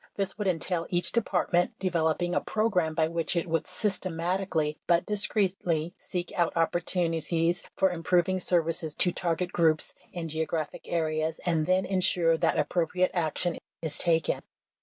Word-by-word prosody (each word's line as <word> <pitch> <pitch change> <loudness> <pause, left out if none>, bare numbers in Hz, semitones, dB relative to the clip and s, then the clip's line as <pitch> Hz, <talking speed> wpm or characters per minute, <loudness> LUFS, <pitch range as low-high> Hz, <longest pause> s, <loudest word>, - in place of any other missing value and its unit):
This 195 -1 -2
would 210 -2 -2
entail 175 -1 0
each 175 -1 +1
De 235 - +2
partment 180 -3 0
developing 175 -1 0
a - - +2
program 180 -8 0
by 160 -1 +2
which 165 +1 -1
it 170 - +1
would 165 -1 -1
system 185 -1 -2
atically 165 -3 -1
but 170 0 +3
discreetly 190 -5 0
seek 175 -1 -5
out 170 -1 +1
opportunities 165 0 +1
for 190 -1 +3
improving 180 +2 +1
services 165 -3 0
to 180 - +3
target 175 +1 -1
groups 160 -2 +2 0.2
and 170 -3 -4
geographic 160 0 -3
areas 160 -1 0
and 165 -3 +1
then 185 +1 +3
insure 180 -3 +3
that - - +1
appropriate 175 +4 +1
action 175 0 -1 0.2
is 155 -2 -2
taken. 165 -2 +2
175 Hz, 150 wpm, -28 LUFS, 160-185 Hz, 0.2 s, but